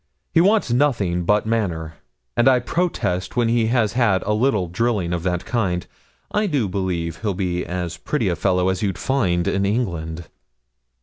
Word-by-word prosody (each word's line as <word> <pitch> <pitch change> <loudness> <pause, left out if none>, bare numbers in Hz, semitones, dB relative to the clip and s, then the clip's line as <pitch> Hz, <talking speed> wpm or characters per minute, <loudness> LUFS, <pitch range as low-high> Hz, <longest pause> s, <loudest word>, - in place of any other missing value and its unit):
He 165 - +5
wants 200 - +3
nothing 115 -10 +1
but 105 +3 +2
manner; 85 -8 -2 0.4
and 120 - +3
I 130 - +5
protest 120 - -1
when 120 -2 +2
he 115 -1 +2
has 115 -3 +1
had 115 -7 +2
a 105 - 0
little 110 -4 +2
drilling 95 -1 0
of 85 - -1
that 90 0 -2
kind, 95 -7 -1 0.5
I 210 0 +1
do 140 - 0
believe 90 -4 -2
he'll 105 -4 -2
be 90 -2 -1
as 90 -1 -4
pretty 135 -9 -1
a 90 - +1
fellow 90 +2 +1
as 95 - -1
you'd 95 -4 -1
find 95 -11 0
in 95 - +1
England.' 85 -7 -2
100 Hz, 175 wpm, -22 LUFS, 90-120 Hz, 0.5 s, He